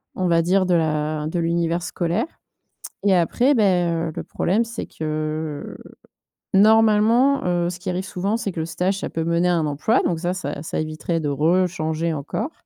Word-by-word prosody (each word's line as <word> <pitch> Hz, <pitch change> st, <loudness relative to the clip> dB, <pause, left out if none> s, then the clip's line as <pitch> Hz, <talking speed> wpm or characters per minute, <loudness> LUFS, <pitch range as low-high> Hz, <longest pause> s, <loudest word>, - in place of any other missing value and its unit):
on 185 Hz, -, 0 dB
va 170 Hz, -1 st, +3 dB
dire, 185 Hz, +2 st, +2 dB
de 180 Hz, -, +3 dB
la 155 Hz, -1 st, 0 dB
de 170 Hz, +2 st, -2 dB
l'univers 170 Hz, 0 st, 0 dB
scolaire 175 Hz, -, -1 dB, 0.8 s
et 195 Hz, -, +5 dB
après, 245 Hz, -, +2 dB
ben, 175 Hz, -6 st, +2 dB
heu, -, -, -8 dB
le -, -, -4 dB
problème, 205 Hz, +6 st, 0 dB
c'est 230 Hz, 0 st, -6 dB
que, 155 Hz, -1 st, -4 dB, 0.8 s
normalement, 220 Hz, +6 st, +4 dB
heu, 175 Hz, -1 st, +1 dB
ce 175 Hz, -, -8 dB
qui 185 Hz, +1 st, -5 dB
arrive 185 Hz, +1 st, -2 dB
souvent, 195 Hz, +4 st, -2 dB
c'est 205 Hz, -4 st, -3 dB
que 165 Hz, -, -5 dB
le -, -, -2 dB
stage, 190 Hz, +3 st, -1 dB
ça -, -, -4 dB
peut 165 Hz, -, -3 dB
mener 170 Hz, +1 st, +1 dB
à 175 Hz, -, +3 dB
un 160 Hz, -, +1 dB
emploi 150 Hz, -, +1 dB
donc 170 Hz, -2 st, 0 dB
ça, 175 Hz, +1 st, -1 dB
ça 145 Hz, -6 st, -5 dB
ça -, -, -3 dB
éviterait 155 Hz, +2 st, -3 dB
de 150 Hz, -, -1 dB
rechanger 160 Hz, +1 st, 0 dB
encore, 185 Hz, -, -4 dB
175 Hz, 190 wpm, -22 LUFS, 160-195 Hz, 0.8 s, et